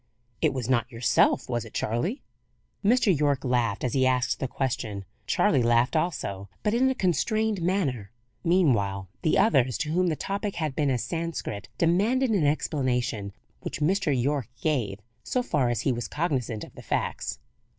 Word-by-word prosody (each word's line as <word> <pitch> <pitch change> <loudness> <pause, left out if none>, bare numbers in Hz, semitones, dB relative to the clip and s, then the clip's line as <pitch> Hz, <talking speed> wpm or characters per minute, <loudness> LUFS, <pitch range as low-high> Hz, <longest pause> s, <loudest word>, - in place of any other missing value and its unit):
It 155 - +3
was 130 -4 -3
not 125 -1 +1
yourself, 115 -1 +2
was 120 -2 -1
it 110 - -12
Charley?" 160 - -1 0.6
Mr. 215 -3 +4
Yorke 145 -2 +1
laughed 120 -5 0
as 125 - -1
he 130 -1 +3
asked 125 -1 +1
the 135 - -1
question. 120 -7 -3 0.2
Charley 130 - +3
laughed 120 +4 +3
also, 100 - -2
but 210 - +1
in 260 +3 +3
a 265 - 0
constrained 215 +1 +1
manner. 150 - 0 0.3
Meanwhile 115 - +2
the 155 - +2
others, 130 - +3
to 155 -2 -2
whom 180 +2 +2
the 160 - +1
topic 200 +4 -3
had 155 -5 -2
been 145 -1 +1
as 125 -3 0
Sanscrit, 160 - -4
demanded 220 +10 +2
an 180 -9 +3
explanation, 125 -8 -1 0.3
which - - -5
Mr. 190 +5 +1
Yorke 135 -1 0
gave, 120 -11 -1 0.2
so 250 - 0
far 140 - +1
as 120 -2 0
he 135 - +1
was 120 -1 -3
cognizant 130 - -2
of - - -11
the - - -11
facts. - - -2
135 Hz, 170 wpm, -27 LUFS, 120-175 Hz, 0.6 s, Mr